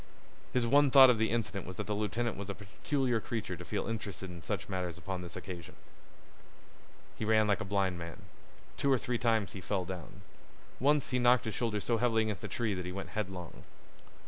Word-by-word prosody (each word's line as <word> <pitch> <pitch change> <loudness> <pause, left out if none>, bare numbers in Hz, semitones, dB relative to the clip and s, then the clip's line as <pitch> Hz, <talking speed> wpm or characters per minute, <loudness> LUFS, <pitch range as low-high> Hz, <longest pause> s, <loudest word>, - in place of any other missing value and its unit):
His 125 -2 +2
one 140 +4 +5
thought 130 -1 +9
of 115 - 0
the 110 - +2
incident 110 -5 -2
was 95 - -6
that 105 - -4
the 105 - -2
lieutenant 110 +3 -1
was 100 0 -6
a 100 - -3
peculiar 120 +4 -1
creature 110 -4 -3
to 90 - -8
feel 100 +3 -2
interested 105 -5 -5
in 85 -1 -9
such - - -3
matters 90 -2 -3
upon 90 +2 -4
this 85 -1 -8
occasion. 85 -4 -7 1.4
He - - -2
ran 110 0 +4
like 100 -3 +2
a - - -3
blind 95 -2 0
man. 85 -1 -8 0.5
Two 140 - +2
or 130 - +5
three 120 0 -2
times 110 -4 +2
he 95 - -7
fell 95 0 -1
down. 90 -3 -8 0.6
Once 145 +1 +3
he 125 - +2
knocked 120 -1 +5
his 110 - -2
shoulder 115 -3 -1
so 115 +4 +1
heavily 115 -1 +3
against 105 -4 -3
a - - -2
tree 115 -4 -1
that 90 -1 -4
he - - -3
went 100 +1 -5
headlong. 95 -5 -5
105 Hz, 210 wpm, -32 LUFS, 95-120 Hz, 1.4 s, thought